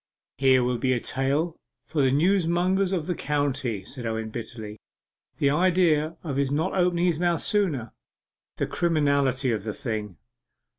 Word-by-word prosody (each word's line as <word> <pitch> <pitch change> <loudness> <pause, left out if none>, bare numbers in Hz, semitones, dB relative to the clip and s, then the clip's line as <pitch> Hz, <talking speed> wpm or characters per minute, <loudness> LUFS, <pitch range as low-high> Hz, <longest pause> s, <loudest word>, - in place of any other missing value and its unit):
'Here 130 -2 +5
will 125 -1 0
be 130 0 +2
a 120 - 0
tale 140 +7 -1 0.3
for 150 - -1
the 135 - +4
newsmongers 180 +4 +2
of 175 -5 -1
the 180 - -1
county,' 135 - -2
said 130 +2 -6
Owen 110 -1 -3
bitterly. 110 -2 -7 0.6
'The 140 - +2
idea 165 -2 +2
of 145 -5 -3
his 140 -1 +1
not 160 +6 0
opening 180 -2 +2
his 170 -3 +1
mouth 175 -1 +1
sooner 155 - 0 0.6
the - - 0
criminality 140 -6 +1
of 110 -4 -2
the 105 -1 -4
thing! 110 - -4
145 Hz, 155 wpm, -25 LUFS, 125-170 Hz, 0.6 s, Here